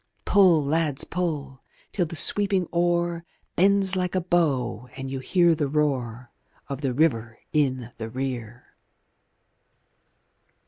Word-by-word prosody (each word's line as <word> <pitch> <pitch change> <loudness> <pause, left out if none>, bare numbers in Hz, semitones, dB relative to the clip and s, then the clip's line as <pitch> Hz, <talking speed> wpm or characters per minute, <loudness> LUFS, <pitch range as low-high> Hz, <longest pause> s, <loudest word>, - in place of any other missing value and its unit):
Pull, 180 -7 +4
lads, 150 -1 0
pull! 150 -7 -4 0.3
till 175 -4 -1
the 165 - -8
sweeping 195 +3 +4
oar 170 0 0 0.3
Bends 195 +1 +3
like 180 0 -2
a - - +2
bow 150 - -1
and 135 0 -6
you 135 - -4
hear 170 +5 +3
the 150 -3 -1
roar 130 -5 -2 0.4
Of 140 -1 -6
the 135 -3 -1
river 120 -5 0 0.2
in 130 -5 0
the 110 0 -5
rear. 120 -2 -6
150 Hz, 125 wpm, -24 LUFS, 130-175 Hz, 0.4 s, Pull